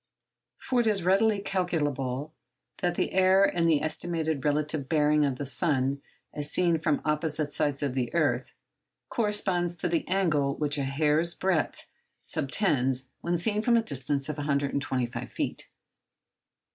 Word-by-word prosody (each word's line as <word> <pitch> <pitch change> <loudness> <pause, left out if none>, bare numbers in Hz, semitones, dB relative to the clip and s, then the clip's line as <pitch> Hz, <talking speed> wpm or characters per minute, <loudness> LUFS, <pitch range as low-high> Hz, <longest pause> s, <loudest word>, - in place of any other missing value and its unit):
For 255 - -1
it 230 - -1
is 200 -4 +1
readily 200 +4 +3
calculable 150 -7 -2 0.5
that 175 -2 0
the - - -1
error 190 +1 +5
in 170 -3 +1
the 155 -3 +3
estimated 160 -2 -1
relative 150 -1 -1
bearing 150 -1 +3
of 135 -3 -1
the 145 - -4
sun 140 -2 0 0.3
as 145 0 -2
seen 170 0 +2
from 155 -2 0
opposite 150 -1 0
sides 145 -1 -1
of 140 -3 -1
the 125 -2 -2
earth 140 -7 +1 0.6
corresponds 190 -6 0
to 175 - +3
the 165 -2 -1
angle 150 -7 +1
which 150 -1 -1
a 140 - -1
hair's 150 +4 +1
breadth 185 -5 -1 0.4
subtends 135 -5 0
when 175 0 -1
seen 210 +4 +1
from 235 +1 +3
a 230 - +2
distance 140 - -2
of 150 -1 -4
125 140 -3 -2
feet. - - -4
150 Hz, 145 wpm, -28 LUFS, 140-175 Hz, 0.6 s, error